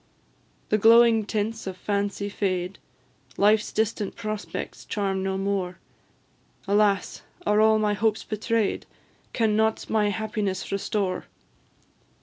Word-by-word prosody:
The 215 Hz, -, +2 dB
glowing 225 Hz, 0 st, +6 dB
tints 220 Hz, 0 st, -2 dB
of 185 Hz, -1 st, -5 dB
Fancy 200 Hz, +1 st, -2 dB
fade, 185 Hz, -2 st, -2 dB, 0.6 s
Life's 210 Hz, +1 st, +3 dB
distant 215 Hz, -1 st, -1 dB
prospects 215 Hz, -2 st, -5 dB
charm 195 Hz, -2 st, -2 dB
no 190 Hz, 0 st, -1 dB
more; 195 Hz, -2 st, -2 dB, 0.9 s
Alas! 200 Hz, -1 st, +2 dB, 0.2 s
are 210 Hz, +1 st, +3 dB
all 220 Hz, 0 st, +5 dB
my 210 Hz, -1 st, +1 dB
hopes 215 Hz, +1 st, 0 dB
betray'd? 215 Hz, 0 st, -1 dB, 0.4 s
Can 220 Hz, -3 st, +1 dB
nought 220 Hz, 0 st, 0 dB
my 210 Hz, -2 st, +2 dB
happiness 205 Hz, -2 st, -3 dB
restore? 195 Hz, -1 st, -1 dB
210 Hz, 115 wpm, -25 LUFS, 195-220 Hz, 0.9 s, glowing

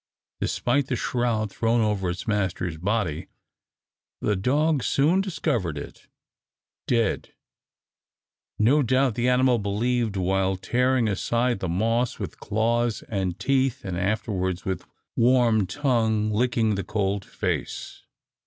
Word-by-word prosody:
Despite 140 Hz, -2 st, 0 dB
the 130 Hz, -, -1 dB
shroud 115 Hz, -4 st, -1 dB
thrown 115 Hz, +2 st, +1 dB
over 105 Hz, -4 st, 0 dB
its 90 Hz, +1 st, -4 dB
master's 95 Hz, -5 st, -1 dB
body, 95 Hz, -2 st, -1 dB, 0.9 s
the 105 Hz, -, 0 dB
dog 145 Hz, +9 st, +1 dB
soon 150 Hz, -, +2 dB
discovered 115 Hz, -, -1 dB
it 70 Hz, -, -9 dB, 0.8 s
dead, 115 Hz, -4 st, 0 dB, 1.2 s
no 130 Hz, +8 st, +4 dB
doubt 130 Hz, 0 st, +2 dB
the 120 Hz, +3 st, +1 dB
animal 125 Hz, -1 st, +3 dB
believed, 110 Hz, +1 st, 0 dB
while 95 Hz, +1 st, +1 dB
tearing 125 Hz, +5 st, +1 dB
aside 120 Hz, +3 st, 0 dB
the 95 Hz, -, -3 dB
moss 115 Hz, +7 st, 0 dB
with -, -, -6 dB
claws 115 Hz, +2 st, 0 dB
and 95 Hz, -4 st, -2 dB
teeth, 130 Hz, +4 st, 0 dB
and 90 Hz, -2 st, -3 dB
afterwards 95 Hz, -1 st, -1 dB
with 95 Hz, -2 st, -3 dB, 0.3 s
warm 115 Hz, -4 st, +3 dB
tongue 110 Hz, -6 st, +1 dB
licking 115 Hz, 0 st, +1 dB
the 100 Hz, -1 st, -2 dB
cold 100 Hz, -1 st, -1 dB
face. -, -, -4 dB
110 Hz, 120 wpm, -25 LUFS, 95-125 Hz, 1.2 s, no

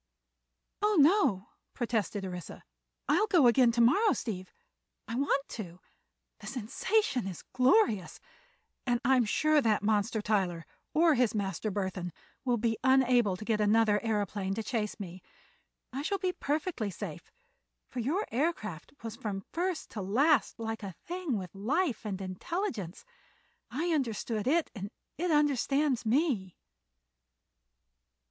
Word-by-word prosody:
"Oh, 420 Hz, -1 st, +3 dB
no," 290 Hz, -, +4 dB, 0.3 s
protested 220 Hz, -5 st, -1 dB
Orissa; 180 Hz, -2 st, -7 dB, 0.4 s
"I'll 425 Hz, -, +3 dB
go 350 Hz, -9 st, +5 dB
again 240 Hz, 0 st, +6 dB
to 235 Hz, -, +2 dB
morrow, 345 Hz, -, +5 dB
Steve. 185 Hz, -5 st, -5 dB, 0.6 s
I 225 Hz, -, -5 dB
want 275 Hz, +2 st, +1 dB
to. 180 Hz, -6 st, -7 dB, 0.6 s
The -, -, -10 dB
sensation 260 Hz, -, 0 dB
is 185 Hz, -4 st, -7 dB
glorious, 250 Hz, -, +3 dB, 0.7 s
and 240 Hz, -1 st, +2 dB
I'm 255 Hz, -2 st, +4 dB
sure 305 Hz, +7 st, +3 dB
that 215 Hz, -4 st, +2 dB
monster, 215 Hz, +1 st, +1 dB
Tyler—or 210 Hz, -, 0 dB
his 245 Hz, -5 st, +2 dB
master, 200 Hz, 0 st, -2 dB
Burthon—will 190 Hz, -, -3 dB
be 225 Hz, 0 st, 0 dB
unable 250 Hz, -7 st, +4 dB
to 215 Hz, -, -8 dB
get 215 Hz, -1 st, +1 dB
another 210 Hz, 0 st, +3 dB
aëroplane 205 Hz, -3 st, -1 dB
to 225 Hz, -, -3 dB
chase 215 Hz, -2 st, -2 dB
me. 185 Hz, -2 st, -7 dB, 0.7 s
I 270 Hz, -, -2 dB
shall 395 Hz, +7 st, -1 dB
be 370 Hz, -1 st, -1 dB
perfectly 295 Hz, -, -2 dB
safe, 190 Hz, -, -7 dB, 0.6 s
for 255 Hz, -, -6 dB
your 310 Hz, -, 0 dB
aircraft 225 Hz, -, -2 dB
was 225 Hz, -1 st, -5 dB
from 195 Hz, -4 st, -5 dB
first 355 Hz, -1 st, -2 dB
to 210 Hz, -, -5 dB
last 245 Hz, +7 st, +2 dB
like 225 Hz, 0 st, -4 dB
a 195 Hz, -4 st, -7 dB
thing 350 Hz, -8 st, -2 dB
with 185 Hz, -3 st, -7 dB
life 250 Hz, -, -1 dB
and 195 Hz, -2 st, -3 dB
intelligence. 195 Hz, -, -4 dB, 0.6 s
I 310 Hz, +8 st, -2 dB
understand 230 Hz, -5 st, -1 dB
it, 325 Hz, +4 st, +2 dB
and 200 Hz, -3 st, -6 dB, 0.3 s
it 355 Hz, +1 st, 0 dB
understands 285 Hz, -3 st, +2 dB
me." 230 Hz, -, +1 dB
230 Hz, 130 wpm, -30 LUFS, 205-295 Hz, 0.7 s, again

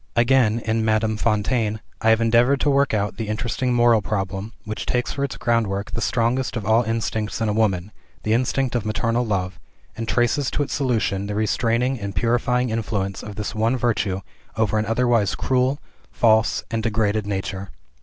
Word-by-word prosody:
Again, 120 Hz, -1 st, +3 dB
in 110 Hz, 0 st, 0 dB
"Madame 110 Hz, 0 st, +1 dB
Fontaine," 110 Hz, 0 st, 0 dB, 0.2 s
I 110 Hz, -, +3 dB
have 110 Hz, 0 st, +5 dB
endeavored 120 Hz, +4 st, +3 dB
to 145 Hz, -, +3 dB
work 140 Hz, 0 st, +3 dB
out 105 Hz, -1 st, -1 dB
the 110 Hz, -, -4 dB
interesting 120 Hz, +4 st, -1 dB
moral 120 Hz, -2 st, +4 dB
problem, 95 Hz, +1 st, -3 dB
which 110 Hz, +1 st, -5 dB
takes 125 Hz, 0 st, 0 dB
for 140 Hz, -, -3 dB
its 140 Hz, -, -3 dB
groundwork 105 Hz, -4 st, 0 dB
the 115 Hz, -, -3 dB
strongest 120 Hz, +3 st, 0 dB
of 105 Hz, -, -5 dB
all 110 Hz, +2 st, +4 dB
instincts 110 Hz, -1 st, -2 dB
in 110 Hz, -, 0 dB
a 105 Hz, -, +1 dB
woman, 105 Hz, -3 st, 0 dB, 0.3 s
the 110 Hz, -, +1 dB
instinct 130 Hz, +2 st, 0 dB
of 120 Hz, -3 st, 0 dB
maternal 115 Hz, +2 st, 0 dB
love, 95 Hz, -4 st, -2 dB, 0.4 s
and 115 Hz, 0 st, -5 dB
traces 120 Hz, +4 st, +1 dB
to 145 Hz, -, -1 dB
its 145 Hz, -, -5 dB
solution 110 Hz, -7 st, 0 dB
the 105 Hz, -, -3 dB
restraining 115 Hz, +4 st, 0 dB
and 100 Hz, -2 st, -5 dB
purifying 120 Hz, +3 st, +1 dB
influence 100 Hz, -3 st, -2 dB
of 105 Hz, -1 st, -8 dB
this 105 Hz, -1 st, -4 dB
one 115 Hz, +4 st, +1 dB
virtue 105 Hz, -6 st, 0 dB, 0.4 s
over 110 Hz, -1 st, +1 dB
an 105 Hz, -, -2 dB
otherwise 115 Hz, -3 st, +2 dB
cruel, 130 Hz, +2 st, +1 dB, 0.3 s
false, 110 Hz, -1 st, +3 dB
and 115 Hz, -1 st, -1 dB
degraded 110 Hz, -1 st, 0 dB
nature. 95 Hz, -1 st, -4 dB
110 Hz, 180 wpm, -22 LUFS, 105-120 Hz, 0.4 s, have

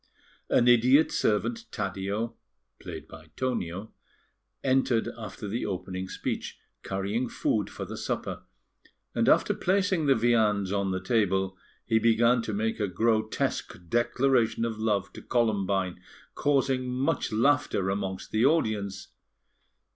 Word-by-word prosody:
An 120 Hz, -, +4 dB
idiot 125 Hz, +6 st, +5 dB
servant, 230 Hz, -, 0 dB
Taddeo 100 Hz, +2 st, -3 dB, 0.5 s
(played -, -, -8 dB
by -, -, -13 dB
Tonio), 110 Hz, -6 st, -3 dB, 0.7 s
entered 130 Hz, -3 st, +2 dB
after 105 Hz, -1 st, -7 dB
the 115 Hz, +5 st, -2 dB
opening 95 Hz, -1 st, -4 dB
speech, -, -, -4 dB, 0.2 s
carrying 100 Hz, +6 st, -2 dB
food 105 Hz, -3 st, 0 dB
for -, -, -6 dB
the -, -, -7 dB
supper; -, -, -3 dB, 0.7 s
and -, -, +2 dB
after -, -, +4 dB
placing 190 Hz, -4 st, +1 dB
the 135 Hz, -, +5 dB
viands 110 Hz, -4 st, +2 dB
on 100 Hz, -1 st, 0 dB
the 95 Hz, 0 st, -1 dB
table, 95 Hz, -4 st, +1 dB, 0.3 s
he 110 Hz, -, +3 dB
began 115 Hz, +2 st, +4 dB
to 115 Hz, -, -4 dB
make 110 Hz, +2 st, -1 dB
a 105 Hz, -, +1 dB
grotesque 110 Hz, +3 st, 0 dB
declaration 120 Hz, -1 st, +2 dB
of 110 Hz, -2 st, -4 dB
love 105 Hz, -3 st, 0 dB
to -, -, -9 dB
Columbine, 100 Hz, -6 st, 0 dB, 0.3 s
causing 135 Hz, -3 st, +1 dB
much 130 Hz, +4 st, 0 dB
laughter 115 Hz, -5 st, +2 dB
amongst 95 Hz, -1 st, -4 dB
the 110 Hz, +1 st, +2 dB
audience. 110 Hz, -10 st, +1 dB
110 Hz, 125 wpm, -28 LUFS, 100-125 Hz, 0.7 s, idiot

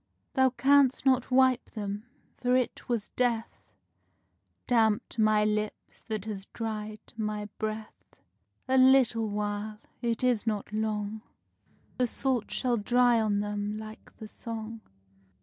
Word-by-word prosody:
Thou 260 Hz, -1 st, +4 dB
can'st 270 Hz, +1 st, +3 dB
not 260 Hz, -2 st, +3 dB
wipe 260 Hz, -1 st, +3 dB
them; 205 Hz, +1 st, -5 dB, 0.3 s
for 250 Hz, 0 st, +1 dB
it 255 Hz, -1 st, -1 dB
was 230 Hz, -4 st, -1 dB
Death 235 Hz, -2 st, -1 dB, 1.1 s
Damped 225 Hz, -2 st, +1 dB
my 215 Hz, -1 st, +4 dB
lips 210 Hz, 0 st, -3 dB
that 215 Hz, -3 st, -3 dB
has 200 Hz, -3 st, -5 dB
dried 215 Hz, -1 st, -6 dB
my 210 Hz, -1 st, -2 dB
breath. 215 Hz, 0 st, -5 dB, 0.6 s
A 260 Hz, 0 st, +4 dB
little 255 Hz, -4 st, +5 dB
while 210 Hz, +1 st, -3 dB, 0.2 s
it 235 Hz, -1 st, -1 dB
is 245 Hz, -3 st, +2 dB
not 210 Hz, -1 st, -2 dB
long 215 Hz, 0 st, -2 dB, 0.8 s
The 250 Hz, -, +3 dB
salt 250 Hz, -2 st, 0 dB
shall 245 Hz, -2 st, 0 dB
dry 240 Hz, +2 st, +3 dB
on 205 Hz, -2 st, +1 dB
them 205 Hz, 0 st, -3 dB
like 215 Hz, 0 st, -11 dB
the 220 Hz, -, -8 dB
song. 225 Hz, 0 st, -6 dB
220 Hz, 130 wpm, -29 LUFS, 210-245 Hz, 1.1 s, little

